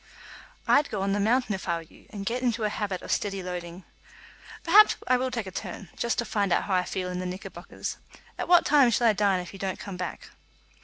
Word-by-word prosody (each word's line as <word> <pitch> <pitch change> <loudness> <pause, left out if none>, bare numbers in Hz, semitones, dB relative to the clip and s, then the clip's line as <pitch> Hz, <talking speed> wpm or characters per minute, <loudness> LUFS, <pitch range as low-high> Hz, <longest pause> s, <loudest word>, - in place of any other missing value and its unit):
"I'd 290 - +4
go 195 -2 -2
on 195 - 0
the 205 - +1
mountain 225 +2 +2
if 190 -2 -5
I 170 - +2
were 165 - -4
you, 160 - -20
and 205 -5 -7
get 245 +5 -1
into 235 -3 0
a 210 - +2
habit 200 -3 -3
of - - -5
steady 195 -2 -1
loading." 180 0 -6 0.8
"Perhaps 415 +5 +7
I 255 - +4
will 255 +1 0
take 235 -4 -3
a 190 - -7
turn, 190 0 -7
just 235 - -1
to 235 - 0
find 200 -4 0
out - - +3
how 195 - -2
I 180 -1 +2
feel 185 -1 -3
in 180 0 -4
the 185 - -3
knickerbockers. 185 +2 -6 0.4
At - - -4
what 350 -1 +6
time 280 -4 +5
shall 235 +1 +1
I 225 - +6
dine 195 -3 +2
if 180 - -10
you 195 - -10
don't 190 -1 -3
come 195 -3 -7
back?" 180 -1 -6
200 Hz, 245 wpm, -27 LUFS, 185-235 Hz, 0.8 s, Perhaps